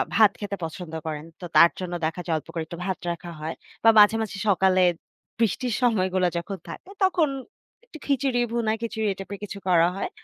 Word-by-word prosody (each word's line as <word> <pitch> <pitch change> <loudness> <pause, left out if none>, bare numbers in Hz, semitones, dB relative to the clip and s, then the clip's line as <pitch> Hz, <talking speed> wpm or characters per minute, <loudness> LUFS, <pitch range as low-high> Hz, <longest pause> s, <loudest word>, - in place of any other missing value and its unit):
ভাত 215 -2 +6
খেতে 205 -1 -3
পছন্দ 160 0 -6
করেন। 150 0 -4 0.2
তো 175 - -5
তার 170 - +8
জন্য 180 -1 -4
দেখা 165 +3 -2
যায় 165 -2 0
অল্প - - -9
করে 165 - -2
একটু 170 - -8
ভাত 190 -1 -2
রাখা 170 0 -7
হয়। 160 +2 -4 0.3
বা, 225 - +8
মাঝে, 210 +2 +7
মাঝে 205 -2 -4
সকালে 190 -1 +4 0.6
বৃষ্টির 230 +2 0
সময়গুলা 185 -6 +2
যখন 190 +3 -4
থাকে - - -9
তখন 345 -5 +3 0.6
একটু 400 - -12
খিচুড়ি 270 -3 +1
ভুনা, 230 -2 0
খিচুড়ি 220 -2 -1
টাইপের 195 +1 -7
কিছু 200 0 -6
করা 170 -1 +5
হয়। - - -3
195 Hz, 190 wpm, -25 LUFS, 175-225 Hz, 0.6 s, তার